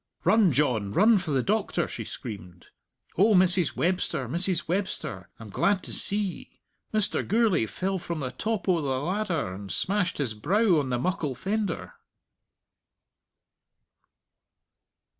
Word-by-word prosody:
"Run, 195 0 +4
John; 120 -8 +1
run 215 +1 +5
for 180 -3 -6
the 135 -3 +1
doctor," 200 -4 0
she - - -6
screamed. 90 -7 -8 0.5
"O 210 +2 +5
Mrs. 180 -2 +3
Webster, 175 -7 0
Mrs. 170 +5 -1
Webster, 165 - -3
I'm 110 -3 -10
glad 200 - +1
to - - -6
see 200 - +2
ye. 200 -4 -5 0.3
Mr. 215 -2 +1
Gourlay 210 - +2
fell 190 - -2
from 170 -1 -5
the 130 -2 -3
top 215 - -3
o' 175 -3 +3
the 145 - -3
ladder, 170 - -2
and 100 0 -8
smashed 195 - 0
his 130 -6 -1
brow 185 - +2
on 135 -3 -2
the 125 - 0
muckle 150 -1 -2
fender." 190 - -3
175 Hz, 140 wpm, -27 LUFS, 130-200 Hz, 0.5 s, run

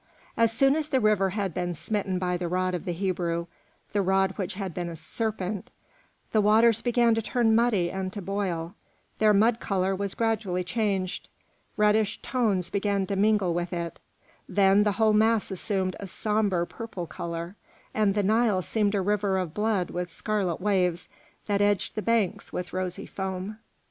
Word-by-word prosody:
As 230 -1 +3
soon 270 +4 +3
as 310 -1 -1
the 265 - +2
river 210 -4 +3
had 195 -2 -2
been 175 0 -2
smitten 195 +2 -2
by 180 -1 0
the 175 0 -2
rod 185 +1 0
of 180 - -3
the 180 - -1
Hebrew, 170 -2 -1 0.5
the 205 - +2
rod 190 0 +2
which 190 -2 -4
had 190 -3 -4
been 175 0 -3
a 170 - -6
serpent, 200 +3 -4 0.6
the 215 - +3
waters 220 +2 +4
began 240 -1 +3
to 225 - +1
turn 225 0 +2
muddy 220 -7 +2
and 190 -1 -3
to 210 - -5
boil; 185 -3 -3 0.5
their 215 -1 +5
mud 220 +3 +4
colour 190 -1 0
was 200 0 -3
gradually 215 -5 0
changed; 190 -1 -2 0.5
reddish 210 0 +2
tones 205 -8 0
began 200 -1 0
to 200 - -2
mingle 200 -3 +2
with 175 +1 -2
it; 170 -2 -4 0.5
then 195 0 +4
the 210 - +2
whole 215 +1 +3
mass 220 0 +3
assumed 190 -1 -1
a 200 - -6
sombre 205 -3 0
purple 195 -3 -6
colour, 170 +3 -5 0.4
and 210 -2 +2
the 205 - +2
Nile 215 -2 +2
seemed 210 0 0
a 200 - +1
river 200 0 +1
of 180 -4 -2
blood 210 -3 0
with 180 0 -3
scarlet 195 -3 -1
waves 180 -3 0 0.4
that 200 -1 +1
edged 205 -2 +1
the 215 - -3
banks 225 -4 0
with 180 -1 -5
rosy 185 -1 -3
foam. 190 +2 -5
195 Hz, 175 wpm, -27 LUFS, 180-215 Hz, 0.6 s, their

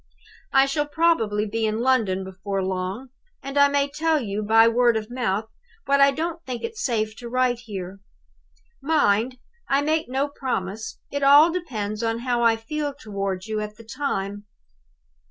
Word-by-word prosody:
"I 270 0 +5
shall 290 +2 -1
probably 290 -11 +1
be 220 +1 -1
in 215 +1 -1
London 225 -7 +2
before 190 +1 -4
long 190 +7 -3 0.3
and 275 +1 -6
I 285 0 +6
may 280 0 +1
tell 315 +2 +1
you 210 -4 -3
by 225 +2 +5
word 235 0 +3
of 215 +1 -6
mouth 220 -4 -1 0.4
what 280 0 +3
I 275 - +7
don't 330 +4 -3
think 250 -5 -6
it 460 - -4
safe 220 - -1
to 240 -1 -8
write 250 -1 +1
here. 195 -2 -7 0.8
Mind, 255 -5 +2 0.3
I 275 +1 +2
make 310 -2 0
no 270 +3 0
promise! 220 -7 -4
It 285 - -2
all 290 +4 +7
depends 215 - -4
on 230 0 -1
how 245 -1 0
I 230 -1 +4
feel 290 +5 -4
toward 195 -6 -4
you 220 -1 -2
at 210 0 -5
the 230 - -14
time. 205 -5 -3
235 Hz, 170 wpm, -24 LUFS, 210-280 Hz, 0.8 s, I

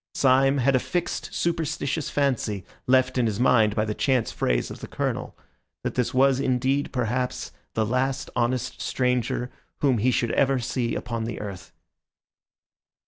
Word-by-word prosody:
Syme 135 +1 +4
had 135 +1 +3
a - - +4
fixed, 175 +6 -3
superstitious 160 -3 -1
fancy, 120 -9 0 0.2
left 130 0 +3
in 120 - +3
his 105 -2 -2
mind 110 -4 +4
by 105 - +1
the 105 - -2
chance 130 0 +1
phrase - - 0
of - - -8
the - - -7
Colonel, - - -3 0.5
that - - -2
this 125 -2 0
was 135 0 +4
indeed, 135 +1 +1
perhaps, 125 0 -2 0.2
the 110 - +2
last 130 +3 -1
honest 125 +1 -1
stranger 125 -1 0 0.3
whom 130 -5 +3
he 120 +5 +3
should 120 -2 +1
ever 135 -1 +3
see 120 -1 -1
upon 115 -2 -3
the 115 -1 -4
earth. 100 -3 -7
125 Hz, 155 wpm, -25 LUFS, 115-135 Hz, 0.5 s, Syme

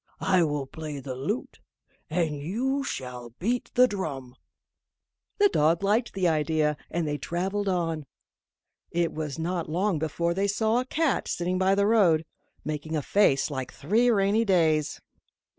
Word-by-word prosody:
I 185 -1 +4
will 145 -3 -1
play 150 +1 -7
the 130 -1 -6
lute, 150 - -4 0.5
and 160 -2 0
you 240 - -1
shall 125 - -6
beat 235 +7 -1
the 250 +1 +7
drum." 140 - -5 1.0
The 410 - +6
dog 165 - +2
liked 215 +4 +1
the 185 -2 +2
idea, 155 -1 +1
and 170 -1 -1
they 145 0 -2
travelled 195 +4 -2
on. 165 -5 -1 0.8
It 170 -1 0
was 155 -2 -4
not 170 0 -2
long 180 +1 0
before 170 +2 -1
they 195 +3 0
saw 220 +3 +1
a 255 - -2
cat 305 +1 0
sitting 180 +1 -1
by 190 +1 +3
the 200 0 +2
road, 185 -8 +4 0.4
making 155 +1 -3
a 150 - -1
face 155 -7 +3
like 130 -2 -4
three 220 - +2
rainy 205 0 +3
days. 160 -7 +2
170 Hz, 155 wpm, -27 LUFS, 150-205 Hz, 1.0 s, the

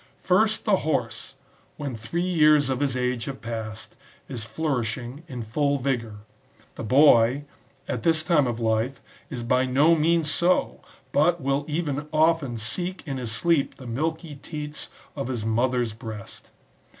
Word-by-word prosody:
First, 215 +4 +2
the 205 -3 +4
horse, 120 - -2 0.4
when 140 -5 -4
three 140 +11 -3
years 150 -5 +4
of 130 - -1
his 140 -3 0
age 125 -2 -1
have 135 -1 -6
passed, 110 -2 -6 0.3
is 120 -5 -5
flourishing 125 -2 -3
in 125 -6 -5
full 140 +6 0
vigour; 120 -6 -2 0.5
the - - -7
boy, 130 +1 +5 0.4
at - - -2
this 160 -2 +2
time 155 -5 +3
of 120 -1 -2
life, 115 +3 0 0.3
is 125 -5 -5
by 125 +2 +2
no 145 +6 +4
means 165 0 +2
so^ 175 +4 +1 0.3
but 170 +4 +3
will 140 +1 0
even 150 -2 -2
often 155 -5 +2
seek 175 - -3
in 135 -3 -3
his 120 -3 -3
sleep 145 +6 +1
the 130 - -12
milky 160 +6 -3
teats 150 -1 -6 0.3
of 140 -3 -3
his 120 -5 -3
mother^s 120 0 +1
breast. 110 -3 -9
135 Hz, 150 wpm, -25 LUFS, 120-155 Hz, 0.5 s, boy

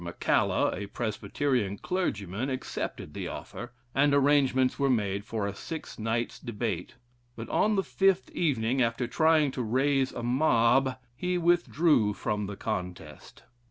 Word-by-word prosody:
McCalla, 85 0 +1
a 100 +2 -5
Presbyterian 115 0 -1
clergyman, 110 - -2
accepted 130 -1 -4
the - - -4
offer, 120 +1 -7 0.2
and 140 +1 +3
arrangements 135 -2 +3
were 140 -1 +2
made 100 -5 0
for 110 -1 -3
a 100 - -3
six 160 +8 -7
nights 115 +2 -2
debate; 110 -6 -4 0.4
but, 115 0 -7
on 215 0 +2
the 195 - +1
fifth 190 -1 +1
evening, 130 -5 0
after 115 +1 +1
trying 155 +1 +3
to 130 - -4
raise 135 +3 +1
a 120 - -6
mob, 125 0 +3 0.2
he 180 +6 -1
withdrew 165 -10 +3
from 105 -3 -2
the 100 - -6
contest. 90 -2 -6
125 Hz, 140 wpm, -28 LUFS, 110-145 Hz, 0.4 s, and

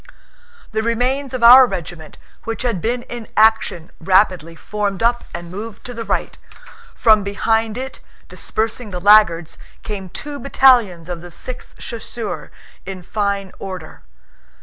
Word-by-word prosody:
The 220 0 0
remains 250 +4 0
of 255 -2 -3
our 250 +2 +10
regiment 165 -5 -7 0.3
which 225 +2 -4
had 230 -8 -1
been 240 +4 -1
in 240 -3 -8
action 215 -6 +3
rapidly 185 -2 +2
formed 205 +1 -3
up 240 +1 +1
and 170 0 -8
moved 210 +3 -8
to 245 - -7
the 230 -1 -5
right; - - -2 0.6
from 215 -3 +4
behind 220 +2 0
it, 265 +1 -6 0.3
dispersing 225 +1 -3
the 180 -2 -5
laggards, 175 -5 +4 0.2
came 195 -3 -6
two 290 +9 -7
battalions 240 - +3
of 175 -2 -5
the 175 - -10
Sixth 250 +9 -9
Chasseurs 230 -1 -6 0.3
in 190 -2 -7
fine 200 0 -2
order. 185 -4 -8
215 Hz, 140 wpm, -19 LUFS, 185-235 Hz, 0.6 s, our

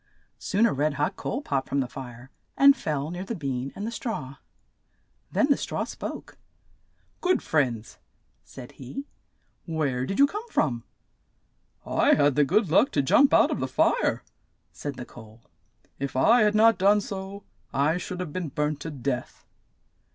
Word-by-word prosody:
Soon 205 +4 +2
a 230 - +2
red 145 +2 0
hot 150 +7 -1
coal 275 - -4
popped 135 - -2
from 140 - 0
the 130 - 0
fire, 125 0 -10 0.3
and 280 0 +7
fell 150 - -3
near 175 +1 -5
the 230 +4 -4
bean 135 -5 -3
and 205 - -5
the 230 - -3
straw. 220 - -5 0.9
Then - - +3
the - - +4
straw - - -3
spoke. - - -7 0.8
"Good 370 0 +1
friends," 125 -8 -1 0.4
said 125 -2 -11
he, 140 - -8 0.6
"where 140 -6 -1
did 195 - -3
you 280 - +7
come 420 +10 -6
from?" 120 - 0 1.0
"I - - +3
had 145 -1 +3
the 150 - +3
good 185 +4 +1
luck 240 +10 +5
to 145 - +2
jump 275 - +5
out - - +5
of - - -2
the - - -1
fire," - - +1 0.5
said 145 -2 -6
the 125 - -7
coal. 110 -1 -14 0.6
"If 140 -1 -4
I 225 - +5
had 210 0 +3
not 225 +1 +5
done 200 +2 +5
so, 195 0 -6 0.3
I 150 +5 +1
should 180 0 -6
have 165 -5 -6
been 180 -4 -3
burnt 150 +1 -2
to 160 - -6
death." 135 -3 -4
150 Hz, 170 wpm, -26 LUFS, 135-205 Hz, 1.0 s, and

